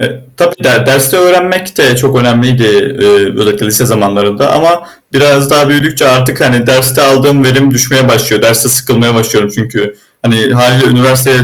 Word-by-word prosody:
E 130 0 -5 0.2
tabii 175 0 -1
der - - +1
derste 135 +3 +1
öğrenmek 185 +1 0
de 125 - +2
çok 135 +1 -1
önemliydi, 125 +1 0 0.4
eee, 405 0 +1
özellikle 105 0 -1
lise 110 +4 0
zamanlarında 100 -2 -1
ama 170 +1 0 0.2
biraz 140 0 +1
daha 145 -1 +2
büyüdükçe 145 -1 0
artık, 130 0 0
hani, 120 -2 0
derste 130 +2 +1
aldığım 135 0 +2
verim 135 +1 +2
düşmeye 130 +1 0
başlıyor. 110 -4 0
Derste 115 +2 +2
sıkılmaya 120 -2 0
başlıyorum 110 -2 -1
çünkü, 105 -3 -5 0.3
hani, 115 +3 0
hâliyle 125 +1 +2
üniversiteye 130 +1 +1
130 Hz, 155 wpm, -8 LUFS, 120-140 Hz, 0.4 s, de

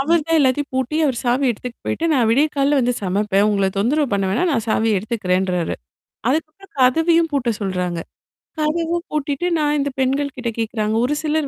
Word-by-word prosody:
அவர்தான் 325 +2 +2
எல்லாத்தையும் 275 +1 +1
பூட்டி, 260 +4 -1
அவர் 255 -4 -1
சாவி 250 +3 +1
எடுத்துட்டு 240 +1 -6
போயிட்டு, 330 - -1
நான் 245 -5 +3
விடிய 280 +6 +4
காலையில 280 +1 +3
வந்து 245 0 +1
சமைப்பேன். 200 +1 +1
உங்கள 200 -2 +1
தொந்தரவு 285 +8 +2
பண்ண 195 -1 0
வேணாம், 295 - +1
நான் 230 -4 0
சாவிய 220 -2 +2
எடுத்துக்கிறேன்றாரு. 185 -4 -1 0.6
அதுக்கப்பறம் 315 +7 -3
கதவையும் 325 +6 +3
பூட்ட 255 -4 +1
சொல்றாங்க. 180 -3 -2 0.6
கதவ 330 +2 0
பூட்டிட்டு 300 +2 -1
நான் 295 0 +1
இந்த 285 0 0
பெண்கள்கிட்ட 265 -2 -1
கேட்கிறாங்க, 220 -1 -1
ஒரு 295 - 0
சிலர் 310 -1 0
260 Hz, 160 wpm, -20 LUFS, 215-300 Hz, 0.6 s, விடிய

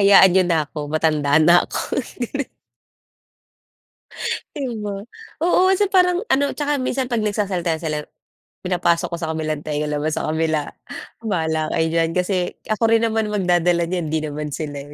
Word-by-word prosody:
hayaan 195 -2 +7
nyo 190 0 +5
na 165 - +3
ako 150 +1 -9
matanda 150 -2 +2
na 175 +3 +6
ako. - - -2 2.5
Di 275 -2 -3 0.2
ba? 200 -1 -4 0.4
Oo 365 +2 +4
kasi 400 +2 +3
parang 360 0 +3
ano 280 -3 +2
tsaka 295 0 -1
minsan 255 0 -1
pag 235 -3 0
nagsasalita 190 -6 -1
sila 155 -2 -3 0.6
pinapasok 175 -2 +1
ko 170 - -3
sa 160 -1 -3
kabilang 155 -1 -2
tenga 150 0 -2
labas 150 +1 -1
sa - - -2
kabila, 155 -2 0 0.6
bahala 160 -5 0
kayo 160 -1 +2
diyan. 165 0 +2
Kasi 180 0 0 0.2
ako 215 +2 +1
rin 225 0 +3
naman 220 -1 +1
magdadala 175 -4 +1
niyan, 175 -3 -1
di 155 0 -1
naman 150 -1 -4
sila, 145 -2 -5
175 Hz, 155 wpm, -21 LUFS, 155-210 Hz, 2.5 s, hayaan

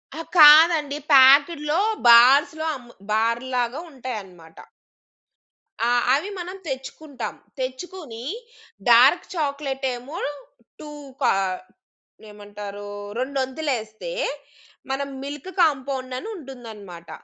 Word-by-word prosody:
ఆహ్, 325 - -7
కాదండి 300 -1 +7 0.2
ప్యాకెట్‌లో 295 +4 +5 0.3
బార్స్‌లో 270 +7 +6
అమ్ము 245 -2 -13 0.2
బార్‌లాగా 240 +4 -1
ఉంటాయన్నమాట. 195 - -9 1.3
ఆ! 240 - +2 0.2
అవి 305 +9 0
మనం 360 +2 -6
తెచ్చుకుంటాం. 270 0 -6 0.3
తెచ్చుకొని 260 -2 -7 0.7
డార్క్ 255 +9 +6
చాక్లేటేమో 275 -2 -3 0.6
2 305 - -9 0.3
కా 250 - +3 1.0
ఏమంటారు, 205 0 -9 0.3
రొండొంతులేస్తే 260 - -3 0.8
మనం 275 +1 -2 0.2
మిల్క్ 290 +5 -7
కాంపౌండ్ 265 -4 0
అనుంటుందన్నమాట, 230 - -10
265 Hz, 75 wpm, -23 LUFS, 235-300 Hz, 1.3 s, కాదండి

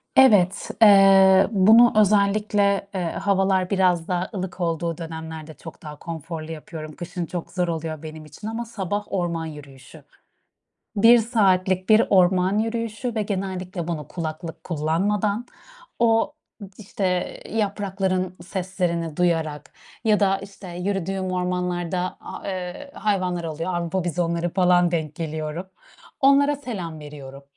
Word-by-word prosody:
Evet. 200 -8 +5
Eee, 195 -2 +7
bunu 225 +4 +6
özellikle, 205 -1 +3
eee, 185 - -1
havalar 195 -1 +1
biraz 180 -4 +2
daha 180 0 -1
ılık 185 -2 -5
olduğu 170 -1 -1
dönemlerde 160 -1 -7
çok 160 +3 -12
daha 150 -2 -9
konforlu 165 -1 -6
yapıyorum. 155 -1 -8
Kışın 175 -1 -5
çok 175 0 -6
zor 180 -1 -1
oluyor 160 -2 -4
benim 155 0 -8
için. 150 +8 -10
Ama 225 +2 -4
sabah 205 -2 -3
orman 170 -3 -1
yürüyüşü. 145 -4 -11 0.9
1 230 +4 +7
saatlik 190 -5 +1
bir 215 +1 +6
orman 185 +1 +3
yürüyüşü 230 +1 -3
ve 220 - +1
genellikle 185 -3 -4
bunu 160 -4 -4
kulaklık 165 0 -6
kullanmadan, 200 +8 0 0.5
o, 230 +4 +3 0.4
işte, 205 -1 -6 0.5
yaprakların 195 -3 -1
seslerini 175 -4 -2
duyarak 160 -4 -1 0.3
ya 215 -2 +3
da, 195 -1 +3
işte, 195 -1 -11
yürüdüğüm 190 +1 -2
ormanlarda, 180 0 -2
a - - -9
eee, 185 +9 -5
hayvanlar 185 -5 -1
oluyor. 165 +3 -3
Avrupa 175 +1 -1
bizonları 170 0 -1
falan, 180 -2 +4
denk 155 -3 -2
geliyorum, 160 +2 -4 0.5
onlara 280 +1 +5
selam 195 - -6
veriyorum. 140 -2 -10
185 Hz, 125 wpm, -23 LUFS, 165-200 Hz, 0.9 s, Eee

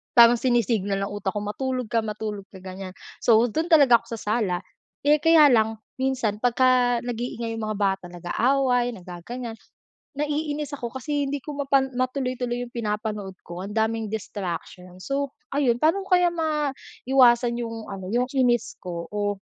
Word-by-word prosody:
Parang 235 0 +8
sinisignal 225 -5 +1
ng 200 - -4
utak 205 -1 -2
ko - - 0
matulog 255 +3 -3
ka, 230 -1 +2
matulog 210 -1 -4
ka, 190 - -11
ganyan. 185 0 -8 0.3
So 225 -2 +6
dun 320 +9 -2
talaga 275 -7 +7
ako 230 0 -7
sa - - -9 0.2
sala, 190 -7 0 0.5
eh, 300 +1 +5
kaya 325 -2 +7
lang, 220 -1 +2 0.2
minsan 250 -6 0
pagka 245 0 +3
nag-iingay 235 -1 -3
yung 225 - -4
mga 210 - -3
bata 195 -2 0
nag-aaway, 245 +8 +1
nagaganyan, 190 +7 -7 0.6
naiinis 295 0 -2
ako 235 0 -6
kasi 285 +2 -2
hindi 280 -1 -3
ko 295 -2 -7
mapan 275 -1 +2
matuloy-tuloy 255 -2 -1
yung 240 - -7
pinapanood 210 -3 -3
ko. 175 +2 -7
Ang 205 - -7
daming 220 0 0
distraction, 185 -3 -6
so, 275 0 -2 0.2
ayun. 245 -4 +2
Paano 375 +5 +3
kaya 360 -2 +4
maiwasan 270 -6 +2
yung 230 -2 -5
ano, 190 -2 -6
yung 250 +1 +1
inis 245 -3 +2
ko, 170 -2 -6
o 205 -1 -2
235 Hz, 155 wpm, -25 LUFS, 210-265 Hz, 0.6 s, Parang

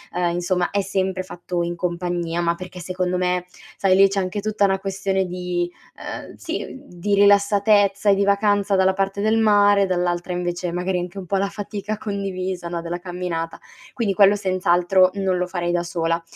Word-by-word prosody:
ehm, 175 -1 +1
insomma 175 0 0
è 200 0 +1
sempre 190 -1 -1
fatto 175 -1 -4
in 170 0 -2
compagnia, 175 -1 -2
ma 170 0 +1
perché 185 0 -9
secondo 180 +1 -2
me, 180 0 0 0.3
sai, 190 -1 +3
lì 195 +1 +7
c'è 195 0 -1
anche 185 +2 -2
tutta 215 -1 +1
una 195 -1 +1
questione, 195 0 -2
ehm, 180 -1 -4
sì, - - -4
mhmm, 265 - -10 0.2
di 205 +3 0
rilassatezza 200 0 +4
e 200 - +6
di 200 - +1
vacanza 200 0 +2
dalla 190 0 +3
parte 195 +1 -1
del 220 +2 +2
mare, 210 -2 +4 0.2
dall'altra 175 -1 -1
invece 175 0 -2
magari 180 +1 -1
anche 180 +2 -6
un 190 - -6
po' 195 - -2
la 195 +1 +1
fatica 205 +1 -5
condivisa, 190 -4 -4
no, 170 -1 -3
della 170 +1 -4
camminata; 175 -2 -4 0.3
quindi 220 -5 0
quello 200 +1 +5
senz'altro 185 -1 +3
non 190 -2 0
lo 180 - 0
farei 175 -1 -2
da 175 0 0
sola. 165 -1 -1
185 Hz, 185 wpm, -22 LUFS, 175-200 Hz, 0.3 s, lì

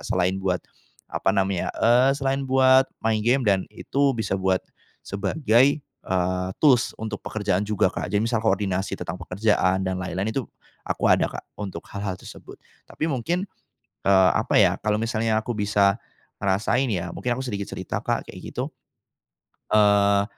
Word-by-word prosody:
selain 95 +1 0
buat, 95 -2 -1 0.5
apa - - -1
namanya, 95 -2 +1
eee, 125 +4 +4
selain 135 -1 -1
buat 130 0 +5 0.2
main 110 -1 +2
gim 120 +4 +2
dan 95 -3 +1
itu 140 -2 0
bisa 110 - -2
buat 95 -1 0 0.4
sebagai, 110 +5 +2 0.2
eee, 90 -7 -2
tools 130 -6 +3
untuk 110 -1 -5
pekerjaan 105 -1 -1
juga, 95 -3 +1
Kak. - - -4
Jadi, 105 +1 +1
misal 115 -1 0
koordinasi 95 -2 0
tentang 90 0 -6
pekerjaan 95 0 +1
dan 95 0 -2
lain-lain 95 +3 -2
itu 130 -3 -3 0.4
aku - - -2
ada - - +4
Kak, - - -8 0.2
untuk 95 -5 -6
hal-hal 100 -2 -3
tersebut, - - -12 0.3
tapi 160 - -3
mungkin, 170 - -1 0.6
eee, 95 -2 +6
apa, - - 0
ya, - - +4
kalau 105 +1 0
misalnya 115 -1 0
aku 120 - -7
bisa 100 0 +2 0.4
ngerasain 105 +7 +1
ya, 85 -1 -3
mungkin 125 +6 -2
aku 130 - -4
sedikit 100 -6 -4
cerita - - -4
Kak, - - -3
kayak - - -11 0.2
gitu. - - -3 1.0
Eee, 100 -1 +4
105 Hz, 155 wpm, -24 LUFS, 95-120 Hz, 1.0 s, eee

